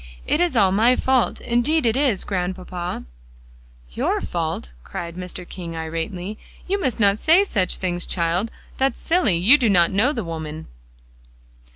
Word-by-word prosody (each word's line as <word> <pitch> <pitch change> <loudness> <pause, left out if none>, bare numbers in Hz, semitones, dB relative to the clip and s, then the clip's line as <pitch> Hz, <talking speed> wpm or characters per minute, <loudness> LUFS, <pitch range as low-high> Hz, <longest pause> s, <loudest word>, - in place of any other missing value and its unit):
It 305 - +1
is 350 -6 +1
all 200 -4 +4
my 225 +6 +4
fault; 260 -2 +1
indeed 245 +5 +1
it 225 0 +2
is, 260 -8 +1
Grandpapa!" 180 - -4 0.9
"Your - - 0
fault," - - -3
cried 170 -1 -6
Mr. 180 0 -7
King 170 -3 -7
irately; 165 +5 -4 0.3
"you 395 +2 0
must 255 -7 -1
not 200 -1 +3
say 340 +5 +5
such 195 - 0
things, 175 -2 -2
child; 175 +5 0 0.3
that's 270 0 +1
silly; 325 - +2
you 225 +13 +6
don't 195 -8 +3
know 220 +9 +3
the 235 -7 -3
woman." 160 -2 -6
195 Hz, 150 wpm, -22 LUFS, 175-255 Hz, 0.9 s, you